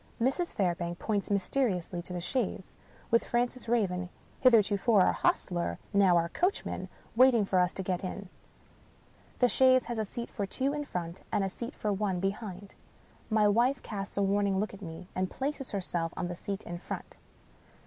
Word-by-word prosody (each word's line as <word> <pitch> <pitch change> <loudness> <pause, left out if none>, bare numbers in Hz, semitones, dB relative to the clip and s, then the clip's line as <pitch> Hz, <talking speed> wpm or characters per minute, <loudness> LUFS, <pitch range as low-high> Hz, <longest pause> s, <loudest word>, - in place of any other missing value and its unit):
Mrs. 270 +9 0
Fairbank 175 -2 0
points 205 -1 -1
mysteriously 195 -4 0
to 180 - -10
the 180 - -3
chaise 190 0 -2 0.2
— - - -26
^with 230 - +5
Francis 240 0 -1
Raven 180 -6 +1 0.3
(hitherto 225 -5 +5 0.2
our 195 -3 +6
hostler, 170 - 0 0.2
now 195 -3 +5
our 170 0 +2
coachman) 360 - -1 0.3
waiting 245 -3 +6
for 190 -1 +2
us 180 0 +3
to 190 - -4
get 185 0 -2
in. 195 +1 -5 1.1
The 250 - +5
chaise 255 +1 +5
has 235 -1 -3
a 215 - 0
seat 235 +4 -6
for 200 -3 -3
two 270 +8 0
in 295 0 -3
front, 170 -6 -5
and 200 - +2
a 195 - 0
seat 235 +6 -6
for 210 -1 -1
one 195 -2 -1
behind. 195 0 -4 0.6
My 215 -2 +4
wife 240 +6 +2
casts 200 -2 -5
a 200 - +3
warning 200 0 +2
look 210 +1 -2
at 200 - -11
me, 165 -1 -8
and 185 0 -1
places 270 0 -3
herself 175 -4 -2
on 175 - -2
the 175 - -4
seat 195 +3 -5
in 175 0 -6
front. - - -7
200 Hz, 180 wpm, -30 LUFS, 180-235 Hz, 1.1 s, our